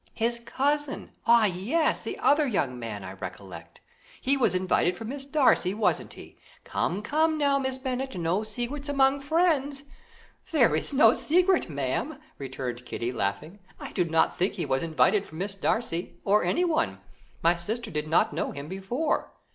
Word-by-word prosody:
"His 235 +1 +1
cousin! 290 +2 -1 0.2
Ah, 235 -1 +6
yes, 210 - 0
the - - -5
other 290 0 +3
young 135 - -1
man, 110 -4 -5
I 95 - -7
recollect. 95 -3 -9 0.4
He 275 +2 +2
was 230 -9 +2
invited 185 -1 +1
for 225 - -7
Miss 275 +4 -5
Darcy, 270 -10 +3
wasn't 220 - 0
he? - - -13 0.2
Come, 200 +4 -2
come, 315 +6 +1
now, 280 -2 +2
Miss 265 -1 -2
Bennet, 260 -2 -4
no 170 +4 0
secrets 240 +7 -3
among 275 0 +3
friends." 285 -2 +1 0.7
"There 240 - +4
is 155 - +1
no 255 -5 +6
secret, 360 - +3
ma'am," 145 - -2 0.2
returned 130 -2 -5
Kitty, 120 0 -4
laughing, 125 - -3 0.2
"I - - -7
do 180 - +1
not 165 -1 +1
think 185 +2 0
he - - -2
was 130 - 0
invited 165 +5 +2
for 160 - -12
Miss 195 +4 -3
Darcy, 195 -3 -2
or 205 +2 +3
anyone; 340 -2 +1 0.5
my 170 +1 +4
sister 215 +7 -4
did 150 0 -3
not 160 - +2
know - - -2
him 140 +1 -7
before." 195 - -2
220 Hz, 165 wpm, -27 LUFS, -, 0.7 s, Ah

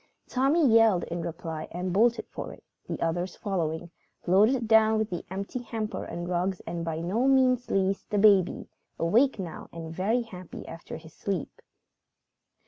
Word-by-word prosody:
Tommy 275 +5 +3
yelled 225 -5 +5
in 170 0 -4
reply 165 -2 -5
and 180 +1 -3
bolted 235 +4 +3
for - - -7
it, - - -14 0.3
the - - -3
others 175 +3 -1
following, 170 -4 -3 0.3
loaded 220 +7 +4
down 220 0 +5
with 220 -1 -1
the 175 - -3
empty 195 +6 -4
hamper 225 -2 -4
and 175 0 -5
rugs, 180 +1 -1
and 170 0 -5
by 165 -1 -3
no 200 +10 0
means 255 -2 +3
least, 195 0 0
the 210 - 0
baby, 200 -3 +4 0.3
awake 230 +12 +3
now 175 -5 -7
and 165 -1 -7
very 220 +8 +1
happy 185 -6 -10
after 165 +1 -8
his 160 -1 -14
sleep. 195 -5 -4
190 Hz, 160 wpm, -28 LUFS, 170-225 Hz, 0.3 s, yelled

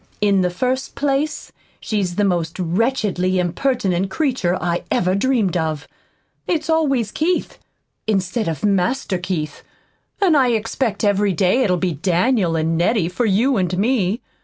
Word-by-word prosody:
"In 200 -2 +3
the 180 - +1
first 255 +8 -2
place, 285 +2 -1 0.3
she's 195 -5 -2
the 205 - +1
most 170 -4 0
wretchedly 185 0 0
impertinent 190 0 0
creature 230 - 0
I 175 0 -1
ever 180 +1 +1
dreamed 210 -3 +1
of. 155 -3 -2 0.6
It's 325 -2 0
always 275 -9 +1
'Keith' 345 +3 -1 0.5
instead 195 +1 0
of 160 +2 -2
'Master 195 +1 0
Keith,' 175 -4 -4 0.6
and 370 -6 +4
I 255 -4 +3
expect 225 +1 -1
every 205 -1 +2
day 185 +8 +2
it'll 185 -7 +2
be 180 -1 -1
'Daniel' 180 - +1
and 160 +1 0
'Nettie' 175 -1 +2
for 225 +6 -1
you 230 +6 +2
and 180 -1 0
me. 215 0 +1
195 Hz, 145 wpm, -20 LUFS, 180-250 Hz, 0.6 s, and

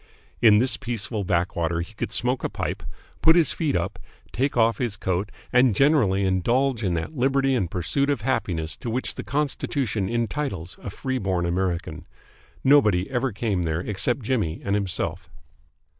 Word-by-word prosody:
In 110 -3 +7
this 125 +4 +2
peaceful 115 -4 -3
backwater 85 -2 0
he 100 +6 -8
could - - -4
smoke 125 +2 +1
a - - 0
pipe, - - -4 0.4
put 160 - +6
his 170 -3 +4
feet 155 -4 -1
up, 90 +2 -2 0.3
take 135 +2 -1
off 115 -2 +3
his 115 -5 -2
coat, 95 +3 -2 0.2
and 125 -3 +5
generally 135 -10 +3
indulge 120 +7 +1
in 90 -3 0
that 85 - -4
liberty 135 +1 +2
and 95 -9 0
pursuit 140 - 0
of 140 -6 0
happiness 95 -10 -1
to 120 - -5
which 125 +3 -1
the - - -6
Constitution 135 -7 -1
entitles 115 - -3
a - - -5
free 130 +5 -3
born 95 -4 0
American. 85 -2 -2 0.6
Nobody 110 -10 +4
ever 130 0 0
came 100 -3 -1
there 80 0 -1
except 110 +7 0
Jimmy 105 -9 -1
and 100 - 0
himself. 100 -3 -2
110 Hz, 165 wpm, -24 LUFS, 95-130 Hz, 0.6 s, In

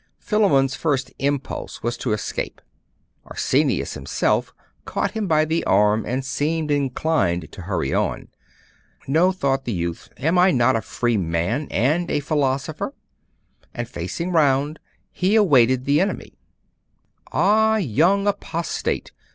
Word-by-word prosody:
Philammon's 145 -12 +2
first 135 -5 -1
impulse 140 0 -3
was 120 +1 -1
to 125 - -2
escape; 105 - -3 0.7
Arsenius - - 0
himself 70 - -1 0.3
caught - - -2
him 220 -3 -3
by 155 -2 +3
the 160 +2 -1
arm, 105 +2 +3
and 130 +2 -2
seemed 155 +3 -1
inclined 135 - 0
to - - -10
hurry 85 -7 -2
on. - - -1 0.8
'No!' 165 +7 +3
thought 135 -7 -1
the 120 - -2
youth, 85 -3 -4
'am 165 +6 +1
I 180 +1 +6
not 130 -5 +3
a 115 - 0
free 120 +2 -1
man, 90 - -1
and 155 +9 +1
a - - +1
philosopher?' 145 - -1 0.8
and - - -3
facing 175 +2 -4
round, 145 -2 +2 0.3
he 190 +4 +1
awaited 130 - +4
the 145 +3 +3
enemy. 195 - -3 1.0
'Ah, 220 +1 +3
young 180 - +2
apostate! 170 -4 -2
140 Hz, 130 wpm, -22 LUFS, 120-165 Hz, 1.0 s, I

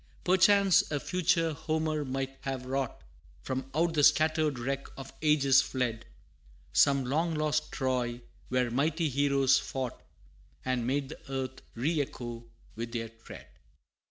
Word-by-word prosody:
Perchance 190 +1 +5
a 145 - -1
future 165 -1 +1
Homer 155 0 -1
might 135 0 -3
have 135 -2 -4
wrought 135 -1 -3 0.4
From 130 0 -4
out 165 +1 +2
the 150 -2 +2
scattered 155 -2 +3
wreck 135 +3 -3
of 135 0 -9
ages 140 -3 +5
fled, 120 -3 -3 0.7
Some 140 -2 +4
long 160 +6 0
lost 150 0 0
Troy, 125 -2 -1 0.3
where 125 -1 +1
mighty 155 +5 +1
heroes 140 0 +3
fought, 130 -3 -5 0.6
And 125 -2 0
made 135 +1 -1
the 155 - -9
earth 130 -1 -4
re 145 +6 +1
echo 120 -3 -6 0.3
with 115 +1 -5
their 115 -1 -3
tread! 115 0 -12
135 Hz, 135 wpm, -30 LUFS, 130-155 Hz, 0.7 s, Perchance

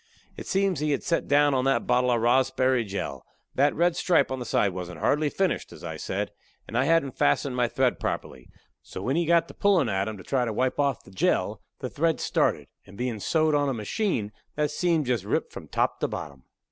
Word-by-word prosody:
It - - -8
seems 195 -4 +1
he 150 -1 +1
had 140 - -2
set 170 - 0
down 145 0 +4
on 130 -1 +1
that 135 0 +2
bottle 125 0 +2
of 120 -2 +2
rossberry 130 0 +3
jell. 100 -2 -5 0.3
That 140 +2 +2
red 175 +1 +2
stripe 175 -6 +2
on 130 - -2
the 125 - -5
side 100 -3 +1
wasn't 90 -2 -6
hardly 150 - +2
finished, 190 +3 -1
as - - -12
I - - -5
said, - - -3 0.4
and - - -8
I 130 +2 +3
hadn't 150 -4 +1
fastened 125 - +2
my 125 -1 +2
thread 130 +1 +1
properly, - - -4 0.3
so 95 - -8
when 130 +6 0
he 170 -1 +1
got 170 0 +4
to - - -10
pullin' 185 - +2
at 95 0 0
'em 110 -1 -5
to 95 - -11
try 130 +3 0
to 115 -2 -2
wipe 130 +5 0
off 140 -1 +1
the - - -16
jell, 95 - 0 0.2
the - - -3
thread 165 +1 +1
started, - - 0 0.2
and 100 - -15
bein' 120 -2 -2
sewed 155 +7 +1
on 145 -1 +2
a 135 - -1
machine, 115 - -1 0.2
that 150 -1 0
seam 165 0 +1
jest 120 -6 0
ripped 100 - -2
from - - -9
top - - 0
to - - 0
bottom. 70 -3 -7
130 Hz, 225 wpm, -26 LUFS, 115-155 Hz, 0.4 s, down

